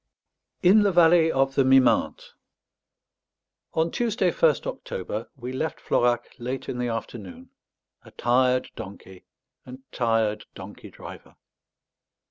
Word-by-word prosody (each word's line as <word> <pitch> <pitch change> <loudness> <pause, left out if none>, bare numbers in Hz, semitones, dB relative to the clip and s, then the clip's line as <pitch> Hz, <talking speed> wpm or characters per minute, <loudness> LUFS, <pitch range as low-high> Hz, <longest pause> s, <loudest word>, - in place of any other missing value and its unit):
IN 195 +4 +6
THE 205 -1 +2
VALLEY 165 -2 +5
OF 135 -1 +1
THE 135 - +3
MIMENTE 130 -1 +2 1.4
On 160 +1 +1
Tuesday, 220 -6 0
1st 155 -4 +2
October, 105 +5 -5
we 125 -1 -7
left 155 +4 -3
Florac 120 0 +1 0.2
late 125 +2 -5
in 125 - -4
the 125 - -1
afternoon, 115 -4 -7 0.5
a - - -15
tired 125 +1 +1
donkey 95 -1 -11 0.4
and 130 +1 -12
tired 115 -3 0
donkey - - -11
driver. - - -12
130 Hz, 115 wpm, -25 LUFS, 120-160 Hz, 1.4 s, IN